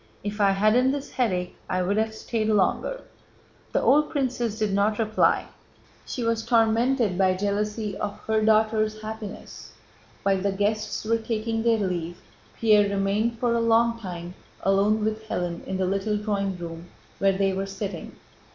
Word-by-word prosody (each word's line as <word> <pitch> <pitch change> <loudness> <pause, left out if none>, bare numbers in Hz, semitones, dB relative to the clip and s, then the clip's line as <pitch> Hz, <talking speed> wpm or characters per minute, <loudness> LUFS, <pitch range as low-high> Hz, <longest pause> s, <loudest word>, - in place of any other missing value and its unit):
"If 210 +1 -3
I 200 - +5
hadn't 215 +7 +3
this 285 0 -5
headache 185 -8 -1
I'd 185 +2 0
have 220 0 0
stayed 220 -1 -2
longer." 215 - +1 0.7
The - - +1
old 300 +2 +4
princess 245 -6 -1
did 215 -3 0
not 205 +2 +2
reply, 220 -1 +2 0.6
she 245 - -4
was 230 -1 0
tormented 230 -3 +2
by 185 -1 +3
jealousy 210 +2 -2
of 205 -1 -4
her 220 0 0
daughter's 215 0 +2
happiness. 215 -1 -8 0.5
While 195 -1 +2
the 200 0 0
guests 210 +2 -1
were 230 +1 +2
taking 225 0 -2
their 230 0 +3
leave 175 -4 -3 0.4
Pierre 210 -2 +4
remained 200 +4 0
for 240 0 +1
a 235 - +1
long 230 0 +3
time 175 -4 -7 0.3
alone 205 +2 +2
with 220 0 -3
Hélène 175 -1 -3
in 190 - -2
the 190 - 0
little 195 +3 0
drawing 200 -3 -2
room 170 0 -7 0.3
where 195 -1 +2
they 195 -1 +2
were 195 +1 -2
sitting. 195 -3 -6
215 Hz, 160 wpm, -25 LUFS, 195-225 Hz, 0.7 s, I